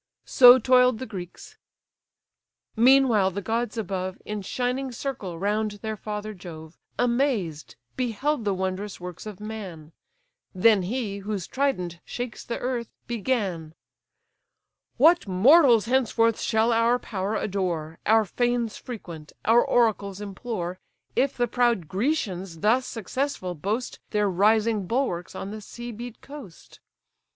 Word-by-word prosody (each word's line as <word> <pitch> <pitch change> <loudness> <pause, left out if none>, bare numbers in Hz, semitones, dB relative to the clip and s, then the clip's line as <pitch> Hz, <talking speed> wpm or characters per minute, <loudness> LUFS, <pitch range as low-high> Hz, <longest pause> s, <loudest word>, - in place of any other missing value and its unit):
So 250 0 +8
toil'd 250 -1 +4
the 260 - -5
Greeks: 185 -6 -9 1.2
meanwhile 240 -4 +5
the 190 +2 -4
gods 230 +3 -2
above, 185 -3 -3
In 210 -1 -4
shining 250 +6 -2
circle 230 -9 -5
round 210 +3 -1
their 220 0 -2
father 210 0 -5
Jove, 165 -4 -10 0.2
Amazed 235 - 0 0.2
beheld 255 +2 -1
the 200 -2 0
wondrous 190 +2 -3
works 180 +3 -8
of 210 -3 -8
man: 190 -8 -8 0.6
Then 205 +2 +5
he, 205 +1 -3
whose 200 -2 -4
trident 180 -12 -1
shakes 245 -2 -6
the 235 - -4
earth, 245 -2 -3 0.2
began: 200 -9 -2 1.2
"What 325 +2 +5
mortals 235 - +6
henceforth 230 -2 +2
shall 225 +2 +2
our 230 +2 +3
power 205 -3 -3
adore, 175 -6 -2
Our 220 +1 +5
fanes 240 +2 -1
frequent, 170 - -9
our 230 +2 +5
oracles 205 -5 +1
implore, 195 -3 -5 0.4
If 265 +2 +1
the 240 -1 +1
proud 235 -7 +1
Grecians 190 - -2
thus 245 +5 +2
successful 225 -3 -3
boast 205 +9 -3
Their 210 -1 +1
rising 210 +1 +2
bulwarks 195 -8 -2
on 195 - -5
the 215 0 -7
sea 240 +3 -8
beat 235 +1 -9
coast? 275 - -12
215 Hz, 125 wpm, -25 LUFS, 190-245 Hz, 1.2 s, So